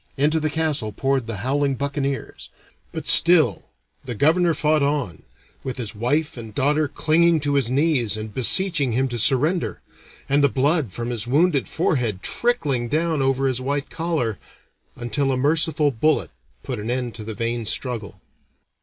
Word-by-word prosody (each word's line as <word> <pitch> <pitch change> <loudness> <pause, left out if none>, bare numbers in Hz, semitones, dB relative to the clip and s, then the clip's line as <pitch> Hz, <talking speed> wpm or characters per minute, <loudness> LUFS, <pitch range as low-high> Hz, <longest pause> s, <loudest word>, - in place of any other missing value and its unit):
Into 150 +3 +2
the 155 0 -1
castle 150 -8 -1
poured 135 +2 -1
the 115 -3 -4
howling 140 +1 0
buccaneers. 140 0 -4 0.4
But - - -6
still 160 - +5 0.4
the 125 -3 -6
governor 165 - +2
fought 155 +1 +1
on, 140 - -1 0.4
with 130 - -5
his 115 -5 -4
wife 140 +8 -1
and 110 -3 -9
daughter 150 +2 +1
clinging 165 +3 +2
to 145 0 -1
his 135 -4 +1
knees 130 -6 +1
and 110 -1 -7
beseeching 145 - +2
him 130 +3 +1
to 120 -1 -4
surrender, 140 - +1 0.5
and 140 +1 +2
the 140 - +5
blood 140 - 0
from 120 +5 -5
his 120 -1 -2
wounded 145 +2 +2
forehead 125 - -1
trickling 150 - 0
down 160 +2 0
over 135 0 +1
his 130 -1 -1
white 140 +2 -3
collar, 155 - -2 0.6
until 135 +4 -1
a 130 - 0
merciful 150 +1 +1
bullet 150 +6 0 0.3
put 125 -4 -5
an 105 +2 -5
end 125 -1 -2
to 110 - -8
the 110 0 -6
vain 115 +1 -3
struggle. 115 -4 -3
135 Hz, 165 wpm, -22 LUFS, 120-155 Hz, 0.6 s, still